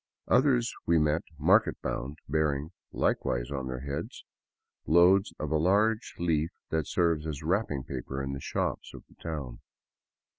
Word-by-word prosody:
Others 125 -1 +3
we 85 - +4
met 75 +1 +2 0.2
market 95 +9 +3
bound, 70 +4 -3
bearing, 75 0 0 0.2
likewise - - 0
on 65 -2 -3
their 65 -1 -4
heads, 70 0 -5 0.6
loads 90 +5 +5
of 75 -1 -4
a 80 - +3
large 105 +7 +2
leaf 80 -2 +1 0.2
that 80 -3 0
serves 85 -3 +1
as 75 -1 -5
wrapping 80 -5 0
paper 65 +1 -5
in 70 0 -3
the 70 - -4
shops - - -3
of - - -11
the - - -22
town. 75 -7 -5
80 Hz, 150 wpm, -29 LUFS, 70-90 Hz, 0.6 s, loads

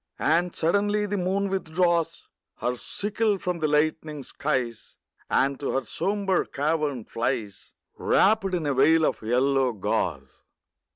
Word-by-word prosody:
And 170 +3 +1
suddenly 205 +5 +1
the 205 0 -2
moon 195 +2 0
withdraws 170 -2 0 0.3
Her 125 - -1
sickle 205 - -1
from 180 -2 -3
the 155 - +1
lightening 150 -1 0
skies, 125 -6 -3 0.3
And 140 0 +1
to 140 - -2
her 135 -1 -1
sombre 195 - 0
cavern 145 -4 -1
flies, 115 -4 -3 0.3
Wrapped 195 -2 +3
in 165 -3 -2
a 145 - +1
veil 155 +4 +4
of - - -1
yellow 130 +3 +2
gauze. 100 - -2
160 Hz, 130 wpm, -26 LUFS, 135-190 Hz, 0.3 s, veil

